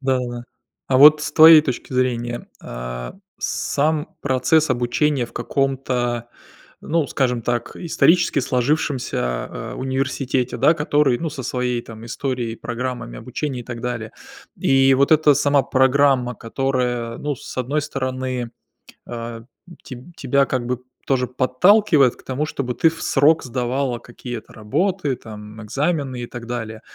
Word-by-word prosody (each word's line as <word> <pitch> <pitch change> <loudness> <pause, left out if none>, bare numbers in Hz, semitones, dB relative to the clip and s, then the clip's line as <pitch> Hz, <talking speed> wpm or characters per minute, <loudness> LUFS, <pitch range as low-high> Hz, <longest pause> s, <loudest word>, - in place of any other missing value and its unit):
Да-да-да, 125 -3 -2 0.4
а 130 - +3
вот 150 +2 +8
с 160 - -3
твоей 160 0 +9
точки 130 -2 -4
зрения, 120 -2 -1
а, - - -6 0.2
сам 150 +1 -1
процесс 140 +3 +2
обучения 125 +2 +1
в - - -18
каком-то, 125 -3 -1 0.5
ну, 160 -2 0
скажем 125 -3 0
так, 120 0 -2
исторически 170 -2 +2
сложившимся, 130 +1 0
а, - - -4
университете, 130 -1 -1
да, 160 - +4
который, 145 -4 +2
ну, 165 -1 -3
со 140 -3 -6
своей 125 -1 -2
там 115 0 -11
историей, 120 -1 -3
программами 120 - -5
обучения 135 - -4
и - - -7
так 120 -2 -7
далее. 120 -2 -4 0.5
И 135 0 +4
вот 140 +3 +3
эта 150 -2 +5
сама 145 0 +3
программа, 130 -2 +3
которая, 125 -1 -2
ну, 145 -1 -3
с - - -10
одной 140 +4 -1
стороны, 130 -3 -3 0.6
а, 115 -1 -6 0.3
м, 175 - -13
теб 125 -2 -9 0.2
тебя 140 +1 +2
как 125 -2 -2
бы 125 0 -2 0.3
тоже 125 -2 +1
подталкивает 140 - +3
к - - -20
тому, 135 +4 -2
чтобы 125 -5 -3
ты 165 - +4
в 165 - -11
срок 150 +3 +3
сдавала 125 0 -2
какие-то 120 -1 -9
работы, 150 - -1
там, 105 -1 -10
экзамены 135 +2 -2
и 120 - -4
так 120 -1 -9
далее. 115 -2 -5
130 Hz, 145 wpm, -21 LUFS, 120-140 Hz, 0.6 s, твоей